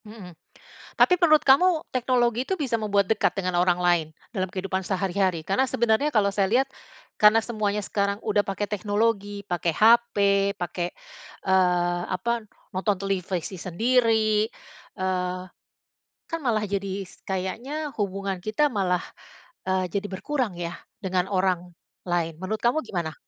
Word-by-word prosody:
Hmm, 210 -5 -11 0.6
tapi 360 - +4
menurut 310 -3 +5
kamu, 320 +4 +5
teknologi 245 -1 +1
itu, 385 - 0
bisa 270 -9 -1
membuat 205 -2 +1
dekat 220 - +2
dengan 185 -3 -1
orang 180 0 +3
lain, 175 -3 +3 0.2
dalam 190 -5 -2
kehidupan 190 0 -3
sehari-hari? 190 -2 0
Karena, 195 +11 +1
sebenarnya 235 +5 +1
kalau 205 -3 +3
saya 195 -1 +1
lihat, 255 +6 +2 0.5
karena 215 +2 +6
semuanya 210 -3 -2
sekarang 200 +1 -1
udah 205 -1 +1
pakai 200 +1 -3
teknologi. 205 0 -1
Pake 175 -3 -1
HP, 235 +4 +5 0.4
pake, 175 -1 -4 0.5
eee, 180 -2 +2
apa, 225 +5 -2 0.2
nonton 195 +2 0
televisi 190 -2 -2
sendiri, 220 +2 +2 0.5
eee, 185 -1 -2 0.9
kan, 330 - -2
malah 235 -7 0
jadi 200 -1 -3
s 185 - -16
kayaknya 240 +11 -3
hubungan 195 -1 -2
kita 220 +10 +1
malah, 180 -5 0 0.6
eee, 185 0 +1
jadi 200 +2 -2
berkurang 240 +1 -2
ya, 170 0 -4 0.3
dengan 185 -1 0
orang 185 -2 0 0.4
lain. 170 -2 0
Menurut 200 +4 -3
kamu 240 +6 +3
gimana? 170 -4 -3
200 Hz, 135 wpm, -25 LUFS, 185-230 Hz, 0.9 s, karena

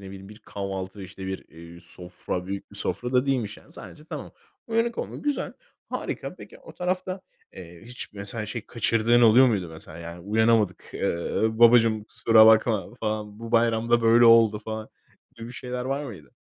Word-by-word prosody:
bileyim 95 0 -11
bir 105 +1 -13
kahvaltı, 95 0 -6
işte 95 0 -9
bir, 95 0 -5
iii, 85 +1 -13
sofra, 90 +1 -7
büyük 100 0 -6
bir - - -11
sofra 125 +1 -2
da 125 +2 +2
değilmiş 120 -6 -1
yani. - - -19
Sadece 150 - -11
tamam. - - -8 0.3
Uyanık 230 +1 0
olmak, - - -6
güzel, 290 -1 -1 0.4
harika. - - -4
Peki, - - -13
o - - -14
tarafta, 185 +1 -3 0.3
eee, 85 -2 -12
hiç 125 +2 -9
mesela, 105 +2 -5
şey, 110 +1 -6
kaçırdığın 115 0 +2
oluyor 120 +3 +7
muydu 100 -8 0
mesela? 80 0 -11
Yani 85 +1 -8
"Uyanamadık." 110 0 +1
eee, 85 +5 -1
"Babacığım, 115 -2 +5
kusura 110 0 +5
bakma." 110 -2 +3
falan, 105 -1 -3
"Bu 115 0 -8
bayram 115 0 +2
da 120 0 +4
böyle 115 +1 +5
oldu." 115 -2 +6
falan, 110 0 -5 0.5
gibi 115 +1 -9
şeyler 125 0 -5
var 135 +3 -2
mıydı? 95 - -11
110 Hz, 170 wpm, -25 LUFS, 95-120 Hz, 0.5 s, oluyor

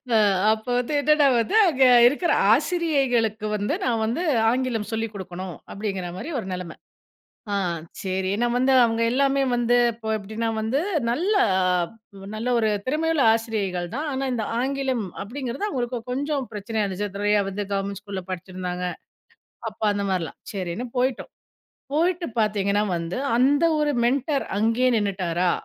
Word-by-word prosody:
அ - - +6 0.4
அப்ப 220 0 -7
வந்து 250 +5 -3
என்னன்னா 300 0 +4
வந்து 300 - 0
அங்க 270 -6 +2 0.2
இருக்கிற 315 +7 +1 0.2
ஆசிரியைகளுக்கு 265 - +1
வந்து 205 +7 -1
"நான் 230 -3 +1
வந்து 245 +11 -1 0.3
ஆங்கிலம் 240 -4 -1
சொல்லிக் 225 -1 -2
கொடுக்கணும்," 185 -3 -7 0.2
அப்டிங்கிற 195 -3 -4
மாரி 305 - -6
ஒரு 220 - -6
நிலைம. 180 -2 -5 0.8
ஆ - - +1 0.5
சரி 190 -1 -1
நான் 240 0 +1
வந்து 260 +2 +3
அவங்க 225 0 -1
எலலாமே 275 +2 +2
வந்து 240 0 +2 0.2
இப்போ 220 0 -7
எப்படின்னா 220 +3 -3
வந்து 225 +6 0 0.3
நல்ல 335 - 0 0.3
அ - - +2 0.7
நல்ல 230 +3 -2
ஒரு 220 -1 +2 0.2
திறமையுள்ள 310 +1 +1
ஆசிரியைகள் 205 -6 -2
தான், 300 +3 -2
ஆனா 270 +1 -2
இந்த 225 - -1 0.2
ஆங்கிலம் 265 -2 -1 0.2
அப்டிங்கிறது 260 - -4
அவங்களுக்கு 245 -2 -2
கொஞ்சம் 280 +1 -1
பிரச்சனயா 215 +1 -2
இருந்துச்சு 200 +1 -4
நிறையா 205 0 +2
வந்து 200 +1 -4
கவர்மெண்ட் 200 0 -3
ஸ்கூல்ல 200 -3 -6
படிச்சிருந்தாங்க. 180 0 -4 0.9
அப்போ 215 +1 -6
அந்த 200 0 -2
மாதிரிலாம் 180 -4 -2
சரின்னு 190 +4 -4
போய்ட்டோம். 255 0 -1 0.6
போயிட்டு 340 +2 +1
பார்த்தீங்கன்னா 205 -1 +1
வந்து 170 +1 -4 0.2
அந்த 280 +5 +3
ஒரு 300 -1 +1
மென்டர் 275 +3 0
அங்கேயே 230 +4 +2
நின்னுட்டாரா 180 -3 0
225 Hz, 145 wpm, -24 LUFS, 200-270 Hz, 0.9 s, அ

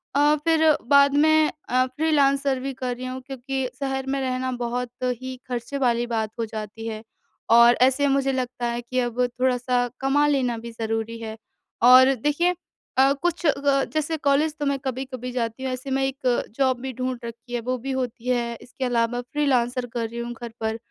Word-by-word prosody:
अ, 295 +1 +5
फ़िर 325 -1 +3 0.2
बाद 280 0 +6
में 310 +1 +4 0.2
अ, 255 +1 +3
फ्रीलांसर 275 -1 +1
भी 270 +1 -4
कर 250 -1 -3
रही 255 +1 -7
हूँ 255 +1 -4
क्योंकि 265 0 -3
शहर 270 -1 -2
में 275 0 -1
रहना 255 0 -1
बहुत 245 +1 -2 0.3
ही 260 0 -5
ख़र्चे 250 +3 -4
वाली 240 -2 +1
बात 220 -2 -2
हो 230 - 0
जाती 220 +1 -7
है। 220 0 -5 0.5
और 235 +1 +8
ऐसे 265 +2 +4
मुझे 275 0 +2
लगता 250 -1 -3
है 235 0 -2
कि 255 +2 -2
अब 240 0 -1 0.2
थोड़ा-सा 250 -1 +1
कमा 275 +2 +2
लेना 255 -5 +1
भी 235 +1 -8
ज़रूरी 225 0 -3
है 220 0 -6 0.5
और 260 +1 +8
देखिए 300 +8 +1 0.4
अ, 270 +1 +6
कुछ 345 +3 -2
ग 275 -1 +2
जैसे 310 +1 -1
कॉलेज 295 +2 +1
तो 290 - -1
मैं 280 0 +1
कभी-कभी 255 -1 -4
जाती 235 +1 -3
हूँ 260 - -1
ऐसे 260 +2 -6
मैं 270 0 +1
एक 265 -2 0
जॉब 260 -2 +2
भी 265 0 -4
ढूँढ 255 +1 -3
रखी 235 +1 -9
है 240 - 0
वो 255 +2 -2
भी 270 +3 -5
होती 250 -2 -4
है 235 -1 0
इसके 255 +1 -5
अलावा 240 0 0
फ्रीलांसर 250 -2 0
कर 230 -2 -1
रही 235 +1 -7
हूँ 240 0 -4
घर 235 0 -8
पर। 220 0 -1
255 Hz, 190 wpm, -24 LUFS, 240-275 Hz, 0.5 s, और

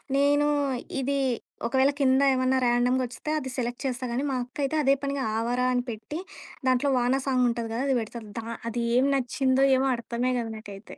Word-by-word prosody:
నేనూ 290 +1 +3 0.5
ఇది 280 +2 0 0.5
ఒకవేళ 265 +3 +3
కింద 265 0 +4
ఏమన్నా 255 0 +2
ర్యాండంగా 245 +2 +2
వస్తే 250 +5 -6
అది 260 -2 -6
సెలెక్ట్ 240 -1 -3
చేస్తా 255 -1 -2
కానీ, 255 +4 -1
మా - - -1
అక్కయితే 275 +4 -3
అదే 275 0 +5
పనిగా 280 -1 -1
'ఆవారా' 245 +2 0
అని 245 - +1
పెట్టి, 220 +8 -6 0.5
దాంట్లో 255 +2 +3
వానా 250 +2 +2
సాంగ్ 255 -2 +3
ఉంటది 230 -1 -4
కదా! 240 - -1
అది 270 - +2
పెడతది. 225 0 -8
దా 225 - -7 0.2
అది 235 +1 -2
ఏం 260 +2 +4
నచ్చిందో 265 +1 +2
ఏమో 270 +1 +1
అర్థమే 235 +2 -2
కాదు, 230 -1 -4
నాకైతే. 205 -1 -11
255 Hz, 180 wpm, -26 LUFS, 240-270 Hz, 0.5 s, అదే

